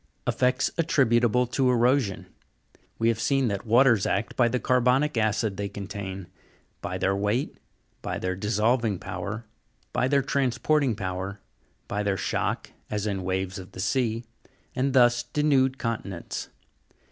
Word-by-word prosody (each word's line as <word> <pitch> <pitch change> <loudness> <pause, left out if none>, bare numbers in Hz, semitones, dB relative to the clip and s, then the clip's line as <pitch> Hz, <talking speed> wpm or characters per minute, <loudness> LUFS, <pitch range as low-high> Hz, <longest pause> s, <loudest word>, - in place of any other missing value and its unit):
EFFECTS 130 +1 +1
ATTRIBUTABLE 125 - +3
TO 125 +2 +1
EROSION. 125 -3 +2 0.7
We 115 - +2
have 115 -1 0
seen 135 +1 +2
that 100 +2 -4
waters 120 -2 +5
act 100 +3 -1
by 120 - +4
the 125 +2 0
carbonic 125 +4 +2
acid 110 -2 0
they 100 0 -3
contain; 100 -2 -6 0.6
by 90 +1 -3
their 95 +1 +1
Weight; 105 +7 -1 0.4
by - - -3
their 90 0 -2
dissolving 110 +2 +1
power; 100 +7 -5 0.5
by 125 - +2
their 140 0 +2
transporting 140 0 +1
power; 95 +1 -4 0.5
by 105 - -2
their 100 -2 0
shock, - - -2 0.2
as 105 -1 -2
in 100 -3 -1
waves 95 +1 -2
of 95 - -11
the - - -9
sea, 115 +1 0 0.5
and 135 +1 0
thus 120 -2 +5
denude 135 0 +2
continents. 110 -8 -4
115 Hz, 140 wpm, -26 LUFS, 100-130 Hz, 0.7 s, waters